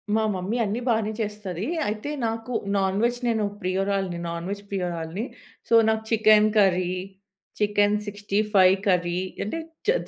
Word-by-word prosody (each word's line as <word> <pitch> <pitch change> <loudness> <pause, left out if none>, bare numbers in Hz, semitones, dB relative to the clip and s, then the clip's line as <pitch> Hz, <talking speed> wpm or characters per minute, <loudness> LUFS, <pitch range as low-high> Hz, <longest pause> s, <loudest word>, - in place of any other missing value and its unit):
మా 220 - +2
మమ్మీ 190 +6 -2
అన్నీ 220 +5 -2
బానే 220 -1 +1
చేస్తది. 210 -3 -4 0.2
అయితే 215 +7 -3 0.2
నాకు 225 +2 -4 0.3
నాన్‍వెజ్ 205 +6 +1
నేను 220 -2 +1 0.2
ప్రియురాలని. 190 -1 -1
నాన్‍వెజ్ 180 +4 -4
ప్రియురాలని. 180 +1 -3 0.4
సో, - - -1
నాకు 220 0 +1
చికెన్ 215 -1 +5
కర్రీ, 185 -3 +3 0.7
చికెన్ 205 0 +3
65 205 -2 +3
కర్రీ 180 -1 +2 0.2
అంటే 210 +10 -3 0.3
చి 465 - +6
205 Hz, 125 wpm, -25 LUFS, 185-215 Hz, 0.7 s, చి